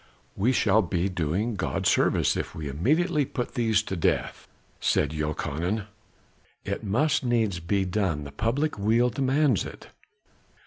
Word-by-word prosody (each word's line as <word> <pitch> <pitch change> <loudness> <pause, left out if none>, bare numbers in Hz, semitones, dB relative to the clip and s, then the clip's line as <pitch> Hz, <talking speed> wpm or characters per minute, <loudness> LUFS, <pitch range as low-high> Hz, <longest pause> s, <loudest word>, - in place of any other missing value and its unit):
"We 110 +7 +2
shall 110 -3 +3
be 90 0 -1
doing 90 +6 -1
God 95 - -2
service - - +3
if - - -4
we 75 -2 -5
immediately 150 - +1
put 125 -2 -4
these 110 -3 +2
to 95 - -4
death," 85 - -1 0.3
said 75 - +1
Jochanan. 80 +6 -2 0.8
"It - - -3
must 135 +10 +1
needs 115 -7 +1
be 95 +3 0
done, 90 -6 -1
the 70 - -8
public 120 - -1
weal 115 +4 +3
demands 135 - +2
it." - - -10
105 Hz, 140 wpm, -26 LUFS, 85-125 Hz, 0.8 s, shall